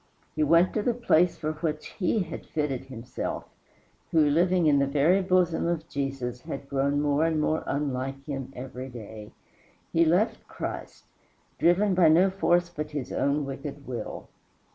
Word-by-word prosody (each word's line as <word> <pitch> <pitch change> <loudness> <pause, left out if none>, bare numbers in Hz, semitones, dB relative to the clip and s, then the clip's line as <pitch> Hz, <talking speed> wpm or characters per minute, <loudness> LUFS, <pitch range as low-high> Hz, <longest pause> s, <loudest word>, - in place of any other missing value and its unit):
He 155 - -1
went 165 +4 +4
to 215 - 0
the 235 +2 0
place 180 -8 +3
for 155 0 -2
which 155 -1 -3
he 200 +3 +2
had 165 -2 -8
fitted 140 -4 -2
himself, 125 -2 -5 0.7
who, 160 - +4
living 175 +4 +3
in 145 -2 +5
the 140 - +2
very 150 +7 +3
bosom 180 -3 +2
of 165 -2 -2
Jesus, 135 -4 -3
had 140 0 -7
grown 140 +1 +1
more 145 +1 +2
and 160 -1 +1
more 155 +1 0
unlike 135 -1 -2
him 135 -3 -5
every 130 +1 -7
day. 110 -3 -9 0.6
He 165 - +5
left 175 +7 +1
Christ - - -6 0.6
driven 190 +4 +4
by 180 -2 +5
no 180 +5 +5
force 175 -2 +2
but 150 -3 -5
his 145 -4 -5
own 140 +1 +1
wicked 140 +1 -7
will. 125 -2 -6
150 Hz, 165 wpm, -27 LUFS, 135-170 Hz, 0.7 s, in